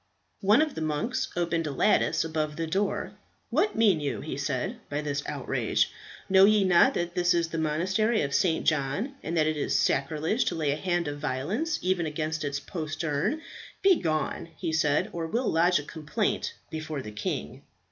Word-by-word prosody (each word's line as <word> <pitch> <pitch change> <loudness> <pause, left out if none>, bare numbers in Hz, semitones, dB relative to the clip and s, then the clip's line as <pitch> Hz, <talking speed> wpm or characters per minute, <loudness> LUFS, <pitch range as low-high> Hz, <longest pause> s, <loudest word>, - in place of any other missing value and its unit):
One 210 +10 +5
of 310 - -3
the - - -5
monks 155 +12 -1
opened 170 -2 0
a - - -2
lattice 140 +10 +2
above 155 -2 -2
the 165 - -2
door. 195 +5 -1 0.4
"What 420 - +2
mean 205 -7 +4
you," 145 -2 -3
he 155 - -5
said, 140 - -2
"by 145 +1 -2
this 145 -1 -2
outrage? - - 0 0.4
Know 190 0 +7
ye 210 0 +4
not 180 -2 +5
that 175 0 -2
this 180 -1 +2
is 170 -1 +1
the 165 - -3
Monastery 185 +9 +1
of 140 0 -3
St. 165 -4 +2
John, 155 - 0
and 165 +1 -3
that 155 - +4
it 155 0 +1
is 145 - 0
sacrilege 155 - +1
to 175 - -1
lay 155 -3 0
a - - 0
hand 175 0 -1
of 145 0 -4
violence 185 - -1
even 180 -2 +1
against 155 +1 -3
its 140 -1 -2
postern? 160 - -2 0.4
Begone," 165 - +1
he 160 - -3
said, 150 -2 +2
"or 165 -1 -3
we'll 235 +8 0
lodge 175 +2 +4
a 145 - -3
complaint 160 +8 -2 0.2
before 155 -3 -4
the 105 - -7
king." 105 0 -4
160 Hz, 185 wpm, -27 LUFS, 150-190 Hz, 0.4 s, Know